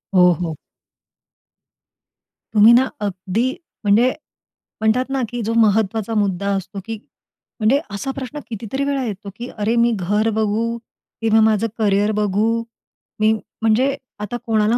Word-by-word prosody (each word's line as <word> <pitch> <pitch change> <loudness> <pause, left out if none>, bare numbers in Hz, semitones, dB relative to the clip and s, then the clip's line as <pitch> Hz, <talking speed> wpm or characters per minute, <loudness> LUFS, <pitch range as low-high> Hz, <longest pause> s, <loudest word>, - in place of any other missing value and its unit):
हो, 180 -1 +7
हो. 160 -3 -3 2.0
तुम्ही 215 +2 +7
ना, 255 +2 +6 0.2
अगदी 200 +4 -1 0.3
म्हणजे 215 +5 +4 0.7
म्हणतात 220 +4 +2
ना, 270 -1 -1
की 245 +1 -4
जो 225 +2 -1
महत्त्वाचा 220 0 +2
मुद्दा 200 -2 0
असतो, 195 +1 -5
की 225 0 -4 0.6
म्हणजे 230 +6 +3
असा 205 +7 -3
प्रश्न 270 +2 -5
कितीतरी 230 +5 -3
वेळा 280 -2 0
येतो, 205 -2 -5
की 240 +2 -6
"अरे, 215 +2 +1
मी 235 0 +4
घर 210 +5 +1
बघू 215 +1 +1 0.6
की 225 - +1
माझं 220 0 +3
करियर 205 -1 +2
बघू? 205 +1 +1 0.7
मी 215 0 +4 0.3
म्हणजे 240 +5 +3 0.2
आता 210 +3 -4
कोणाला 220 0 +2
220 Hz, 135 wpm, -20 LUFS, 205-235 Hz, 2.0 s, हो